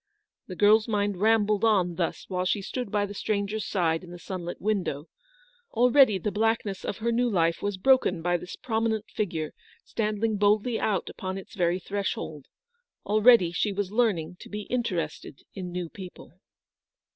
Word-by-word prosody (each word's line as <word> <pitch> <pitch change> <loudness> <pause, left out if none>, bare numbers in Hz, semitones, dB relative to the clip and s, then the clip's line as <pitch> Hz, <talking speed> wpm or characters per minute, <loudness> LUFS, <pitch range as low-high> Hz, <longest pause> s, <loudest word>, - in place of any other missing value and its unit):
The 185 - -7
girl's 210 +3 +5
mind 205 -3 0
rambled 210 0 +2
on 190 -6 +3
thus 170 -1 -3
while 180 -1 -2
she 195 +2 0
stood 250 +2 -4
by 205 0 +1
the 205 - -7
stranger's 205 +1 -2
side 165 -3 0
in 180 - -11
the 175 - -9
sunlit 175 0 -6
window. 185 -8 -2 0.6
Already 245 -2 +5
the 200 +3 -2
blackness 220 -2 0
of - - -3
her 235 +2 -1
new 240 +1 +2
life 165 -5 +1
was 205 -1 -2
broken 255 -6 +3
by 175 0 +2
this 180 +2 -8
prominent 220 -2 -2
figure 165 -7 -3 0.3
standing 215 0 -1
boldly 210 +3 +2
out 195 -5 0
upon 190 0 -5
its 195 - -10
very 175 -2 +1
threshold. 190 -6 -4 0.6
Already 215 -4 +5
she 205 +4 0
was 200 -1 -3
learning 185 -7 0
to - - -11
be 210 0 -5
interested 175 - -3
in 185 -2 -6
new 180 -1 -3
people. 180 -1 -11
205 Hz, 165 wpm, -27 LUFS, 180-220 Hz, 0.6 s, girl's